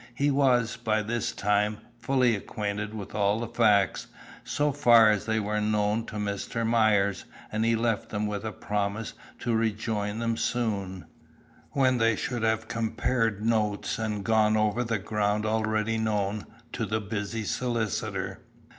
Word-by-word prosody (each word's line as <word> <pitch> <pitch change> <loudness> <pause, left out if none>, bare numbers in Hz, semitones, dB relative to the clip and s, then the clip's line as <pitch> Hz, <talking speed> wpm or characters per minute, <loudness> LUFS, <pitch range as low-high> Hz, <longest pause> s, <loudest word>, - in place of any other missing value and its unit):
He 145 +3 +2
was, 125 -5 +2
by 110 -2 0
this 115 +2 -2
time, 105 +1 +1 0.2
fully 125 -1 +2
acquainted 105 +1 -4
with 100 -3 -7
all 105 0 +1
the 120 - -3
facts, 105 -6 +2 0.4
so 145 0 0
far 120 -6 +6
as 105 0 -1
they 110 0 +1
were 105 0 -1
known 105 +1 0
to 110 - -8
Mr. 105 +2 -2
Myers, 110 -4 +2 0.3
and 110 +1 0
he 115 0 +3
left 115 -2 -1
them 105 0 -2
with 105 -1 -3
a 110 - -3
promise 105 +1 -3 0.3
to 120 - 0
rejoin 110 -1 -1
them 115 0 -1
soon, 100 -6 -2 0.7
when 130 -3 +3
they 115 0 +3
should 120 +2 -3
have 110 0 0
compared 115 -1 -1
notes 110 -3 0
and 105 -3 -2
gone 110 -1 +3
over 110 +3 +1
the 115 -2 -1
ground 105 +1 -1
already 110 0 0
known 105 -2 -1 0.2
to - - -3
the 110 +1 0
busy 105 +1 -4
solicitor. 115 -1 -2
110 Hz, 155 wpm, -27 LUFS, 105-115 Hz, 0.7 s, far